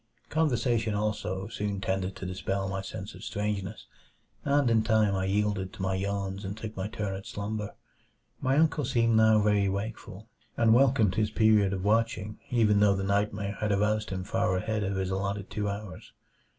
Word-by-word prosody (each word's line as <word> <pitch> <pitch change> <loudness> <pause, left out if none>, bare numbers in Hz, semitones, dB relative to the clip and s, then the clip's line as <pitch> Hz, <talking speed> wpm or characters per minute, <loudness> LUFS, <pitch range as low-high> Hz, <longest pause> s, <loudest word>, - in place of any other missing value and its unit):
Conversation, 120 -8 +1
also, 100 -2 -2
soon 105 -3 -3
tended 95 0 -2
to 95 - -7
dispel 95 +1 -2
my 95 0 -3
sense 95 +1 -7
of - - -12
strangeness; 105 0 -3 0.6
and 140 -1 +2
in 115 -1 +4
time 110 -2 +3
I 95 -1 0
yielded 100 -1 0
to - - -6
my 95 0 0
yawns 100 +1 -2
and 100 +2 -5
took 110 -1 -7
my 95 +1 -3
turn 105 -3 -3
at 95 - -8
slumber. 105 0 -4 0.7
My 130 +2 +2
uncle 155 -1 +3
seemed 115 -3 +2
now 110 -1 +5
very 105 -2 +3
wakeful, 100 +1 -5 0.3
and 115 -1 +5
welcomed 120 -6 +4
his 110 -1 +1
period 110 -3 +4
of 95 -2 -3
watching 110 -1 0
even 110 -4 +3
though 100 -1 +5
the 95 - -2
nightmare 100 0 -1
had 105 -1 0
aroused 105 +2 +1
him 95 -1 -3
far 95 -1 0
ahead 110 +3 -1
of 100 0 -1
his 95 -1 -1
allotted 100 +1 -3
two 105 0 -1
hours. 100 -4 -7
105 Hz, 180 wpm, -28 LUFS, 95-110 Hz, 0.7 s, now